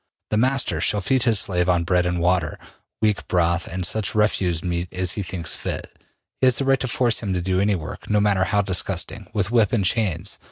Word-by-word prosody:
The 105 Hz, -, +1 dB
master 130 Hz, +4 st, +1 dB
shall 105 Hz, -3 st, +2 dB
feed 130 Hz, +7 st, +1 dB
his 115 Hz, -4 st, +5 dB
slave 90 Hz, -2 st, +3 dB
on 90 Hz, -1 st, +2 dB
bread 90 Hz, 0 st, +1 dB
and 90 Hz, 0 st, -1 dB
water, 85 Hz, -2 st, +1 dB, 0.5 s
weak 105 Hz, -2 st, 0 dB
broth 85 Hz, 0 st, +1 dB
and 95 Hz, 0 st, -2 dB
such 105 Hz, +1 st, -1 dB
refuse 95 Hz, -6 st, +1 dB
meat 85 Hz, -1 st, -3 dB
as 90 Hz, -1 st, -2 dB
he 105 Hz, -, -3 dB
thinks 90 Hz, -4 st, -3 dB
fit. -, -, -6 dB, 0.5 s
He 130 Hz, -, +5 dB
has 125 Hz, -, +3 dB
the 135 Hz, -, -1 dB
right 135 Hz, -1 st, +3 dB
to 130 Hz, -, -2 dB
force 120 Hz, -1 st, +1 dB
him 100 Hz, -3 st, -2 dB
to 90 Hz, -, -1 dB
do 95 Hz, +1 st, 0 dB
any 100 Hz, +1 st, +2 dB
work, 80 Hz, -4 st, -8 dB
no 105 Hz, -, +2 dB
matter 100 Hz, -2 st, +2 dB
how 105 Hz, 0 st, +1 dB
disgusting, 95 Hz, +1 st, -2 dB
with 105 Hz, -1 st, -1 dB
whip 115 Hz, -4 st, +3 dB
and 105 Hz, -5 st, +1 dB
chains. 95 Hz, -3 st, -1 dB
95 Hz, 225 wpm, -22 LUFS, 90-110 Hz, 0.5 s, his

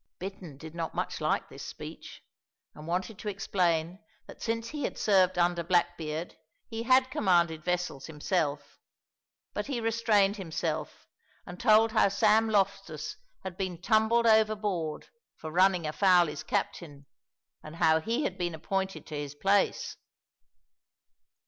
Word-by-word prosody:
Bittern 185 Hz, -6 st, -8 dB
did 160 Hz, +2 st, -10 dB
not 165 Hz, -1 st, -4 dB
much -, -, -3 dB
like -, -, 0 dB
this -, -, -11 dB
speech, -, -, -9 dB, 0.5 s
and 150 Hz, +1 st, -11 dB
wanted 185 Hz, +4 st, -2 dB
to 210 Hz, -, -4 dB
explain 180 Hz, -3 st, 0 dB, 0.3 s
that -, -, -13 dB
since 230 Hz, 0 st, -2 dB
he 300 Hz, -1 st, -5 dB
had -, -, -3 dB
served 185 Hz, -3 st, +3 dB
under 175 Hz, 0 st, +2 dB
Blackbeard 170 Hz, -2 st, -1 dB, 0.3 s
he 225 Hz, 0 st, -5 dB
had 255 Hz, +2 st, +4 dB
commanded 170 Hz, -7 st, +2 dB
vessels 180 Hz, -6 st, -2 dB
himself, 150 Hz, -1 st, -2 dB, 0.7 s
but -, -, -3 dB
he 270 Hz, -4 st, -2 dB
restrained 220 Hz, -3 st, +2 dB
himself 170 Hz, -6 st, -4 dB, 0.4 s
and 175 Hz, 0 st, -9 dB
told 225 Hz, -1 st, +5 dB
how 220 Hz, -2 st, +4 dB
Sam 220 Hz, +2 st, +3 dB
Loftus 200 Hz, -2 st, -1 dB, 0.3 s
had 190 Hz, -2 st, -6 dB
been 185 Hz, -3 st, -3 dB
tumbled 220 Hz, +4 st, +3 dB
overboard 210 Hz, -7 st, +1 dB, 0.3 s
for 155 Hz, -, -7 dB
running 180 Hz, 0 st, +3 dB
afoul 180 Hz, +3 st, +4 dB
his 150 Hz, -1 st, -5 dB
captain, 145 Hz, -2 st, -3 dB, 0.6 s
and 155 Hz, +1 st, -10 dB
how 160 Hz, -1 st, +4 dB
he 235 Hz, -, -1 dB
had 185 Hz, -5 st, -3 dB
been 175 Hz, -2 st, -2 dB
appointed 190 Hz, +4 st, -3 dB
to 155 Hz, -, -7 dB
his 145 Hz, -1 st, -5 dB
place. 195 Hz, +5 st, +1 dB
185 Hz, 140 wpm, -29 LUFS, 165-215 Hz, 0.7 s, told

